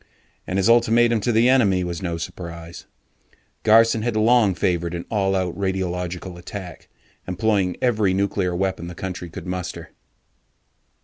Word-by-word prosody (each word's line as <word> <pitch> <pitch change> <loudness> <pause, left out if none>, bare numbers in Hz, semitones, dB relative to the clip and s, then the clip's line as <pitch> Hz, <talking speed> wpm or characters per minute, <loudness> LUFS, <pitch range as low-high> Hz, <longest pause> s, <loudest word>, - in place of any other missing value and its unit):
And 90 - -2
his 95 - +2
ultimatum 115 0 +4
to 120 - +1
the 115 +2 +4
enemy 105 -8 +3
was 85 -2 -4
no 85 -3 -3
surprise. 85 0 -8 0.7
Garson 115 0 +5
had 120 0 -1
long 110 -3 +4
favored 85 -1 -1
an 85 - -5
all 95 -3 +1
out 90 -2 -1
radiological 90 -2 -3
attack, 90 -4 -9 0.4
employing 95 -1 0
every 110 -6 +2
nuclear 95 -2 0
weapon 95 -2 -2
the 85 - -8
country 90 -1 -6
could 80 - -9
muster. 90 -3 -5
95 Hz, 140 wpm, -22 LUFS, 90-110 Hz, 0.7 s, Garson